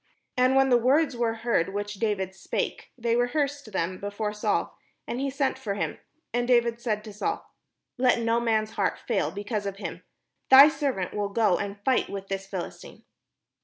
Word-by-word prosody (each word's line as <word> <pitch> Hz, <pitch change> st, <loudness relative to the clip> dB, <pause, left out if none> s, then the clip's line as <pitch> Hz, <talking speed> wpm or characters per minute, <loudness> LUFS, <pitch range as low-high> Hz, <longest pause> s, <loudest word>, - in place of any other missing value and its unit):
And 255 Hz, +1 st, +3 dB
when 270 Hz, 0 st, +5 dB
the 245 Hz, -1 st, +5 dB
words 275 Hz, +4 st, +3 dB
were 235 Hz, -1 st, 0 dB
heard 195 Hz, -5 st, +1 dB
which 205 Hz, 0 st, -4 dB
David 195 Hz, -4 st, -1 dB
spake, 190 Hz, -, -4 dB
they 235 Hz, -1 st, +1 dB
rehearsed 280 Hz, 0 st, -1 dB
them 185 Hz, -1 st, -2 dB
before 205 Hz, +1 st, -3 dB
Saul: 210 Hz, -, -1 dB, 0.3 s
and 240 Hz, -, -3 dB
he 275 Hz, +1 st, 0 dB
sent 270 Hz, -1 st, -1 dB
for 205 Hz, -6 st, -3 dB
him. 200 Hz, -, -3 dB, 0.3 s
And 240 Hz, 0 st, 0 dB
David 235 Hz, -1 st, +3 dB
said 215 Hz, -3 st, -1 dB
to 215 Hz, -2 st, -9 dB
Saul: 410 Hz, -, -3 dB, 0.5 s
"Let 250 Hz, -1 st, +4 dB
no 230 Hz, 0 st, +2 dB
man's 220 Hz, -2 st, +1 dB
heart -, -, 0 dB
fail 200 Hz, -10 st, -1 dB
be 200 Hz, +5 st, -6 dB
cause 205 Hz, -2 st, -2 dB
of 195 Hz, -, -4 dB
him; -, -, -6 dB, 0.5 s
thy 275 Hz, +3 st, +10 dB
servant 275 Hz, -, -2 dB
will 205 Hz, -1 st, -1 dB
go 210 Hz, -3 st, +2 dB
and 200 Hz, 0 st, -4 dB
fight 260 Hz, -1 st, +2 dB
with 195 Hz, -1 st, -6 dB
this 195 Hz, 0 st, -3 dB
Philistine." 190 Hz, -3 st, -7 dB
225 Hz, 185 wpm, -27 LUFS, 200-250 Hz, 0.5 s, thy